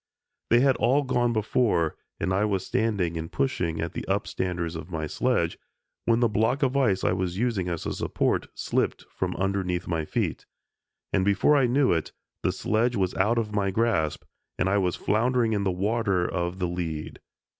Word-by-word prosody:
They 120 Hz, +1 st, +5 dB
had 135 Hz, -1 st, +4 dB
all 135 Hz, +5 st, +3 dB
gone 120 Hz, -2 st, +1 dB
before, 110 Hz, -6 st, +1 dB, 0.2 s
and 90 Hz, +3 st, 0 dB
I 100 Hz, +2 st, +2 dB
was 100 Hz, -3 st, 0 dB
standing 100 Hz, -7 st, 0 dB
and 80 Hz, 0 st, -6 dB
pushing 90 Hz, -12 st, -1 dB
at 85 Hz, 0 st, -3 dB
the -, -, -4 dB
upstanders 85 Hz, -2 st, -2 dB
of 80 Hz, +1 st, -7 dB
my 80 Hz, -3 st, -3 dB
sledge, 75 Hz, -, 0 dB, 0.5 s
when 115 Hz, +1 st, +3 dB
the 120 Hz, -, +5 dB
block 110 Hz, +6 st, +1 dB
of 130 Hz, 0 st, +1 dB
ice 105 Hz, -9 st, +2 dB
I 85 Hz, -, +3 dB
was 90 Hz, -1 st, -1 dB
using 105 Hz, -6 st, 0 dB
as 85 Hz, -2 st, -3 dB
a -, -, -2 dB
support -, -, 0 dB
slipped -, -, -1 dB
from -, -, -2 dB
underneath 95 Hz, -2 st, -1 dB
my 80 Hz, -3 st, -1 dB
feet, -, -, -2 dB, 0.7 s
and 95 Hz, -, +3 dB
before 100 Hz, +9 st, +4 dB
I 135 Hz, -3 st, +4 dB
knew 130 Hz, +2 st, +3 dB
it 80 Hz, -2 st, -2 dB, 0.3 s
the -, -, +1 dB
sledge 120 Hz, +3 st, 0 dB
was 95 Hz, -3 st, 0 dB
out 105 Hz, +5 st, +2 dB
of 110 Hz, -2 st, -1 dB
my 100 Hz, -1 st, +1 dB
grasp, 95 Hz, -7 st, 0 dB, 0.3 s
and 95 Hz, -, +1 dB
I 100 Hz, +1 st, +3 dB
was 90 Hz, -2 st, 0 dB
floundering 115 Hz, +1 st, +1 dB
in 100 Hz, -1 st, 0 dB
the 95 Hz, -, +2 dB
water 95 Hz, -1 st, 0 dB
of 85 Hz, 0 st, -2 dB
the 90 Hz, -1 st, -1 dB
lead. 85 Hz, -3 st, -4 dB
100 Hz, 190 wpm, -26 LUFS, 90-115 Hz, 0.7 s, They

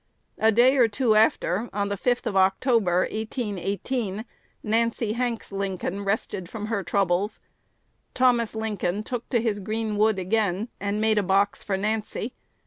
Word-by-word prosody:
A 220 Hz, +1 st, +5 dB
day 250 Hz, +5 st, +5 dB
or 240 Hz, -3 st, +6 dB
two 225 Hz, +1 st, +1 dB
after, 215 Hz, -1 st, +2 dB
on 200 Hz, 0 st, -1 dB
the 200 Hz, -, -1 dB
5th 245 Hz, +5 st, 0 dB
of 195 Hz, -, -2 dB
October, 190 Hz, -1 st, +3 dB
1818, 215 Hz, 0 st, -3 dB, 0.4 s
Nancy 225 Hz, 0 st, 0 dB
Hanks 240 Hz, -2 st, -2 dB
Lincoln 195 Hz, 0 st, -3 dB
rested 195 Hz, -3 st, -2 dB
from 215 Hz, -2 st, -5 dB
her 215 Hz, -2 st, -1 dB
troubles. 195 Hz, +1 st, 0 dB, 0.8 s
Thomas 240 Hz, -3 st, +2 dB
Lincoln 210 Hz, -3 st, -2 dB
took 245 Hz, +1 st, -5 dB
to 240 Hz, -, +2 dB
his 220 Hz, -3 st, -1 dB
green 215 Hz, +1 st, -2 dB
wood 215 Hz, -1 st, +3 dB
again, 200 Hz, +2 st, 0 dB
and 200 Hz, +1 st, -2 dB
made 215 Hz, -1 st, +3 dB
a -, -, +2 dB
box 200 Hz, +1 st, +1 dB
for 195 Hz, -3 st, -2 dB
Nancy. 215 Hz, +4 st, -2 dB
215 Hz, 150 wpm, -25 LUFS, 195-230 Hz, 0.8 s, or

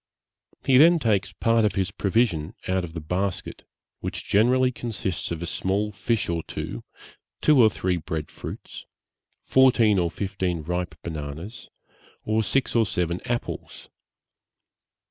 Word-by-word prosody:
He 130 Hz, -, +5 dB
then 170 Hz, +3 st, +7 dB
takes 110 Hz, -, +1 dB
part 115 Hz, 0 st, +2 dB
of 105 Hz, -3 st, +1 dB
his 95 Hz, 0 st, 0 dB
provision 95 Hz, -6 st, 0 dB
out 95 Hz, 0 st, +1 dB
of 80 Hz, -2 st, -7 dB
the 85 Hz, -, -4 dB
basket, 90 Hz, +5 st, -3 dB, 0.3 s
which -, -, -5 dB
generally 125 Hz, +5 st, +3 dB
consists 110 Hz, -8 st, -3 dB
of 85 Hz, 0 st, -4 dB
a -, -, -2 dB
small 100 Hz, +5 st, -1 dB
fish 110 Hz, +2 st, -1 dB
or 85 Hz, -1 st, -1 dB
two, -, -, -6 dB, 0.6 s
two 150 Hz, -4 st, +5 dB
or 110 Hz, -, +7 dB
three 95 Hz, -3 st, -1 dB
bread 80 Hz, -2 st, -4 dB
fruits, -, -, -9 dB, 0.6 s
fourteen 120 Hz, -6 st, +4 dB
or 85 Hz, -1 st, +1 dB
fifteen 95 Hz, -3 st, -2 dB
ripe 90 Hz, 0 st, -3 dB
bananas, 80 Hz, +6 st, -6 dB, 0.6 s
or 110 Hz, +1 st, +2 dB
six 125 Hz, +6 st, 0 dB
or 115 Hz, -2 st, +4 dB
seven 90 Hz, -1 st, -1 dB
apples. 120 Hz, -1 st, -4 dB
95 Hz, 140 wpm, -25 LUFS, 85-115 Hz, 0.6 s, then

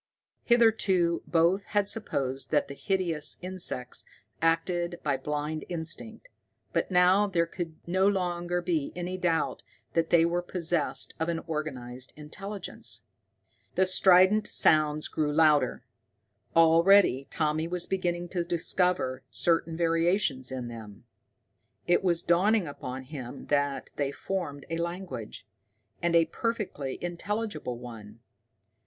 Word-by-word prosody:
Hitherto 210 Hz, -8 st, +3 dB
both 170 Hz, +4 st, +3 dB
had 200 Hz, -1 st, +3 dB
supposed 135 Hz, -, -3 dB
that 150 Hz, -, +2 dB
the -, -, -7 dB
hideous 175 Hz, -2 st, -1 dB
insects 180 Hz, -9 st, -2 dB, 0.4 s
acted 170 Hz, +1 st, 0 dB
by 145 Hz, -2 st, +1 dB
blind 150 Hz, +3 st, -3 dB
instinct, 175 Hz, -, -5 dB, 0.5 s
but -, -, 0 dB
now 185 Hz, +3 st, +4 dB
there 170 Hz, -4 st, +1 dB
could 165 Hz, -1 st, -6 dB
no 185 Hz, +3 st, +2 dB
longer 175 Hz, -2 st, -1 dB
be 165 Hz, -5 st, -1 dB
any 180 Hz, +1 st, -3 dB
doubt 175 Hz, -3 st, 0 dB, 0.3 s
that 165 Hz, -1 st, +1 dB
they 165 Hz, -1 st, +5 dB
were 175 Hz, +1 st, 0 dB
possessed 175 Hz, -3 st, -1 dB
of 160 Hz, +1 st, -1 dB
an 170 Hz, -, 0 dB
organized 130 Hz, -6 st, -5 dB
intelligence. 195 Hz, +6 st, -4 dB, 0.7 s
The 190 Hz, -, +4 dB
strident 185 Hz, +3 st, +5 dB
sounds 155 Hz, -1 st, +3 dB
grew 150 Hz, -1 st, -1 dB
louder. 155 Hz, -1 st, +3 dB, 0.7 s
Already 165 Hz, -3 st, +5 dB
Tommy 155 Hz, 0 st, 0 dB
was 175 Hz, 0 st, -2 dB
beginning 175 Hz, -2 st, -2 dB
to 180 Hz, -1 st, -1 dB
discover 170 Hz, -5 st, +1 dB
certain 165 Hz, -1 st, +1 dB
variations 165 Hz, -5 st, +1 dB
in 130 Hz, -2 st, -4 dB
them. 110 Hz, -3 st, -10 dB, 0.8 s
It 175 Hz, -, +3 dB
was 170 Hz, -3 st, +1 dB
dawning 195 Hz, +4 st, +3 dB
upon 130 Hz, -3 st, -6 dB
him 130 Hz, -2 st, -8 dB
that 145 Hz, -1 st, 0 dB
they 140 Hz, -1 st, 0 dB
formed 145 Hz, -4 st, -4 dB
a 165 Hz, -, -1 dB
language 170 Hz, -, -5 dB, 0.6 s
and 170 Hz, 0 st, +1 dB
a 165 Hz, -1 st, +6 dB
perfectly 185 Hz, -, -3 dB
intelligible 200 Hz, -, -3 dB
one. 115 Hz, -2 st, -11 dB
170 Hz, 125 wpm, -28 LUFS, 150-185 Hz, 0.8 s, a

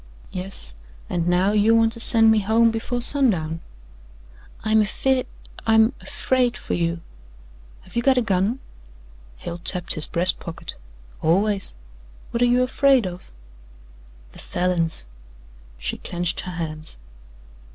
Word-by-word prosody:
"Yes, 180 Hz, -, -3 dB, 0.4 s
and 170 Hz, -1 st, -1 dB
now 180 Hz, +3 st, +2 dB
you 215 Hz, +2 st, +3 dB
want 225 Hz, 0 st, +3 dB
to 230 Hz, -, -4 dB
send 225 Hz, -1 st, +4 dB
me 220 Hz, -, +3 dB
home 225 Hz, +3 st, +3 dB
before 240 Hz, +2 st, -1 dB
sundown." 185 Hz, -, +5 dB, 1.0 s
"I'm 220 Hz, 0 st, +3 dB
afeer 255 Hz, +5 st, 0 dB, 0.4 s
I'm 220 Hz, +2 st, +4 dB
afraid 255 Hz, -4 st, -1 dB
for -, -, -5 dB
you. 170 Hz, 0 st, -1 dB, 0.8 s
Have -, -, -18 dB
you 235 Hz, -, +1 dB
got 265 Hz, +1 st, +3 dB
a 250 Hz, -, +2 dB
gun?" 200 Hz, +3 st, 0 dB, 0.8 s
Hale 170 Hz, -, -7 dB
tapped 180 Hz, +1 st, 0 dB
his 155 Hz, -, +1 dB
breast 175 Hz, +2 st, +3 dB
pocket. 170 Hz, -, -8 dB, 0.5 s
"Always. 195 Hz, -, +1 dB, 0.6 s
What 235 Hz, -, -2 dB
are 245 Hz, -, +5 dB
you 250 Hz, +1 st, +3 dB
afraid 260 Hz, -2 st, +3 dB
of?" 180 Hz, -1 st, -8 dB, 1.0 s
"The -, -, -14 dB
Falins." 170 Hz, -, -2 dB, 0.7 s
She -, -, -4 dB
clenched 175 Hz, -1 st, -2 dB
her 180 Hz, -, -5 dB
hands. 155 Hz, -, -6 dB
205 Hz, 130 wpm, -22 LUFS, 175-235 Hz, 1.0 s, sundown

